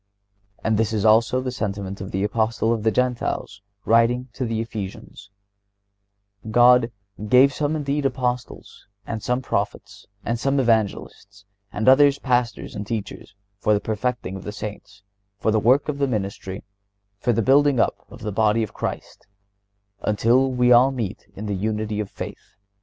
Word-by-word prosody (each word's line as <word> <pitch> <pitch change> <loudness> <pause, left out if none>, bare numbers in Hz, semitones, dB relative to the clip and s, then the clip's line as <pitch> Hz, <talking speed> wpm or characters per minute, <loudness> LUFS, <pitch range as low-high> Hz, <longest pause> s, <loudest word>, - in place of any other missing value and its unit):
And 110 -1 +1
this 110 0 0
is 105 -1 0
also 115 +4 +4
the 130 0 -3
sentiment 100 -4 -4
of 95 - -6
the 95 +1 -2
Apostle 110 +2 0
of 115 - -2
the 110 - +2
Gentiles 120 -4 -2 0.2
writing 120 +3 +3
to 130 - -3
the 115 -1 -2
Ephesians: 105 -2 -7 1.2
God 120 +1 +5 0.4
"gave 135 +4 +6
some 150 +1 -1
indeed 145 -1 0
Apostles, 125 -2 -4 0.2
and 110 -1 -4
some 125 +4 -1
Prophets, - - -4 0.2
and 115 0 -1
some 140 +2 +1
Evangelists, 105 -4 -1 0.3
and 110 - -3
others 140 +1 +6
Pastors 125 -4 -1
and 100 0 -6
Teachers, 105 -2 -6 0.2
for 105 +1 +2
the - - +1
perfecting 110 -3 -3
of 95 - -8
the 105 - -5
Saints, 100 -1 -8 0.3
for 110 - 0
the 110 - +2
work 125 +7 +3
of 145 -2 -3
the 140 - +2
ministry, 100 -4 -4 0.6
for 120 - +1
the 115 0 +1
building 140 0 +4
up - - 0
of - - -13
the 105 - -3
body 110 +2 +2
of 110 - -6
Christ, - - -6 0.7
until 120 +5 +2
we 125 -1 +2
all 125 +2 +7
meet 115 -8 -5
in 105 - -6
the 105 - -2
unity 105 +2 -2
of 105 -2 -3
faith - - -9
115 Hz, 165 wpm, -23 LUFS, 105-125 Hz, 1.2 s, all